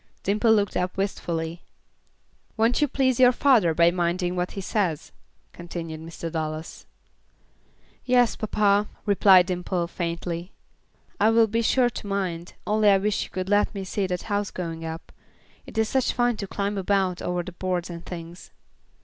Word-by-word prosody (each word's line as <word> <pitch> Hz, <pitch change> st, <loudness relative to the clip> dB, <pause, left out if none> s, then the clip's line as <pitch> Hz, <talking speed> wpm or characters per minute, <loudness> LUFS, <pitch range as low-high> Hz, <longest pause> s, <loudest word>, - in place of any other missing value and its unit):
Dimple 215 Hz, +3 st, +2 dB
looked 205 Hz, -3 st, +2 dB
up 180 Hz, +1 st, -2 dB
wistfully. 170 Hz, -4 st, -3 dB, 1.0 s
"Won't 230 Hz, +4 st, +2 dB
you 295 Hz, -, +4 dB
please 260 Hz, -2 st, +1 dB
your 250 Hz, -1 st, +7 dB
father 240 Hz, -, +3 dB
by 170 Hz, +1 st, +5 dB
minding 175 Hz, 0 st, -1 dB
what 180 Hz, 0 st, -2 dB
he -, -, -5 dB
says?" 185 Hz, -6 st, -2 dB, 0.4 s
continued 170 Hz, -2 st, -7 dB
Mr. 165 Hz, 0 st, -7 dB
Dallas. 155 Hz, -1 st, -5 dB, 1.2 s
"Yes, 245 Hz, -2 st, +3 dB
papa," 205 Hz, -1 st, +2 dB, 0.2 s
replied 195 Hz, -3 st, +6 dB
Dimple, 180 Hz, 0 st, -2 dB
faintly, 170 Hz, +1 st, -4 dB, 0.7 s
"I 215 Hz, -, +5 dB
will 225 Hz, 0 st, +5 dB
be 225 Hz, +2 st, -1 dB
sure 245 Hz, +1 st, +2 dB
to 215 Hz, -, -7 dB
mind, 185 Hz, -4 st, -3 dB
only 210 Hz, 0 st, +3 dB
I 195 Hz, -, +6 dB
wish 205 Hz, +2 st, -1 dB
you -, -, -14 dB
could 185 Hz, +1 st, -4 dB
let 205 Hz, +1 st, +2 dB
me 195 Hz, -, -4 dB
see 190 Hz, +1 st, -2 dB
the 180 Hz, -1 st, -4 dB
house 205 Hz, -2 st, -1 dB
going 165 Hz, -2 st, -5 dB
up. 160 Hz, 0 st, -7 dB, 0.6 s
It -, -, -11 dB
is 220 Hz, -1 st, +2 dB
such 265 Hz, -2 st, +1 dB
fun 245 Hz, -1 st, +1 dB
to 200 Hz, -, -5 dB
climb 200 Hz, +1 st, -2 dB
about 190 Hz, -2 st, 0 dB
over 180 Hz, 0 st, -2 dB
the 185 Hz, -, -8 dB
boards 180 Hz, 0 st, -2 dB
and 170 Hz, 0 st, -8 dB
things." 170 Hz, 0 st, -9 dB
190 Hz, 165 wpm, -25 LUFS, 170-210 Hz, 1.2 s, your